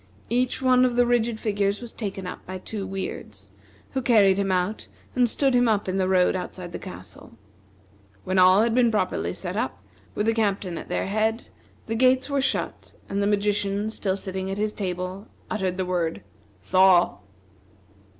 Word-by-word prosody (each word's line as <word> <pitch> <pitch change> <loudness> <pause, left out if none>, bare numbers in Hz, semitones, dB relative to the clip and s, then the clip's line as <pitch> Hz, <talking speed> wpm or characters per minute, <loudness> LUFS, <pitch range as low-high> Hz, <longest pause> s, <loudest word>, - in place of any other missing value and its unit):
Each 250 +2 0
one 255 -1 +5
of 250 -1 +2
the 245 0 +4
rigid 235 -2 +1
figures 205 -2 0
was 240 -2 -9
taken 195 -4 -5
up 180 - -7
by 185 +1 -5
two 195 +1 -6
Weirds, 195 0 -6 0.4
who 265 - -1
carried 205 -6 +4
him 195 -1 0
out 185 +3 -1 0.3
and 245 -2 +3
stood 270 +3 +1
him 245 -1 +4
up 210 -3 +1
in 185 +1 -1
the 185 - +1
road 185 -1 +3
outside 180 -1 -5
the - - -6
castle. 90 +5 -9 0.9
When 185 0 +1
all 185 +3 +6
had 230 0 +1
been 245 -1 +4
properly 215 -2 -1
set - - -4
up, - - -2 0.4
with 210 - 0
the 225 - +3
captain 200 -6 -1
at - - -10
their - - -1
head, 220 +3 -1 0.4
the 225 - -3
gates 255 +4 +3
were 280 -1 +2
shut, 265 - -2 0.2
and 200 +1 -1
the 200 - +2
magician 205 0 0
still 195 -3 -2
sitting 190 -1 -5
at 195 - -3
his 210 0 -1
table, 185 +1 -4 0.2
uttered 190 -4 -1
the 185 - -1
word, 170 - -2 0.4
"Thaw!" 185 - +4
200 Hz, 180 wpm, -25 LUFS, 185-230 Hz, 0.9 s, all